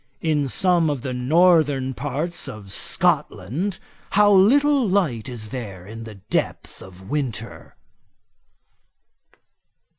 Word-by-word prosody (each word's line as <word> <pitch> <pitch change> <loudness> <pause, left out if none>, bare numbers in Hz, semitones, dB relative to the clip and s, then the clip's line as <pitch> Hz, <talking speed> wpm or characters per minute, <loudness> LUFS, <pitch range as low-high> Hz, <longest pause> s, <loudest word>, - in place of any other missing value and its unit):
In 150 -3 0
some 175 +2 +2
of 140 -5 -3
the 130 - -3
northern 145 -1 +3
parts 145 +7 -3
of 100 -3 -9
Scotland 150 - -1 0.4
how 205 0 +5
little 265 +5 +4
light 150 - 0
is 110 -4 -7
there 105 -8 -7
in 115 +3 -9
the 110 -2 -10
depth 100 +2 -4
of 95 0 -13
winter!' 125 -6 -5
140 Hz, 110 wpm, -22 LUFS, 115-175 Hz, 0.4 s, how